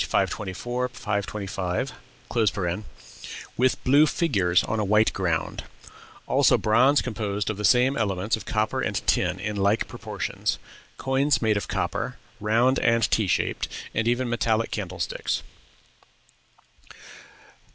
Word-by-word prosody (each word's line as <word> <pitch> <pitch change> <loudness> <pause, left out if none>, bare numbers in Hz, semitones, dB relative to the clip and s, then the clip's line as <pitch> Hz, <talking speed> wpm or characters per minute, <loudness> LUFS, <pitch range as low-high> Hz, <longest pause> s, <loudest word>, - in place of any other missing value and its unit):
524, 120 +6 -1
525), 100 -1 -3 1.6
"with 130 +1 +1
blue 145 +4 +5
figures 95 - +2
on 110 +1 -2
a - - +1
white 105 +2 +3
ground;" 85 -4 -2 0.6
also - - +4
bronze 130 +6 +4
composed 105 -3 -2
of 105 - -6
the 105 - -5
same 125 +6 +4
elements 100 -2 0
of 110 - -8
copper 110 0 0
and - - -2
tin 90 +1 +1
in 105 +2 -3
like 100 +3 +2
proportions; 110 -6 -3 0.4
coins 135 +2 +2
made 110 -2 +2
of 100 -4 -2
copper, - - -2 0.2
round 115 +5 +3
and 115 -3 +2
T 110 -3 +2
shaped, - - 0 0.3
and 115 0 0
even 120 +1 +1
metallic 115 -1 0
candlesticks. 95 -4 -3
110 Hz, 120 wpm, -25 LUFS, 100-120 Hz, 1.6 s, blue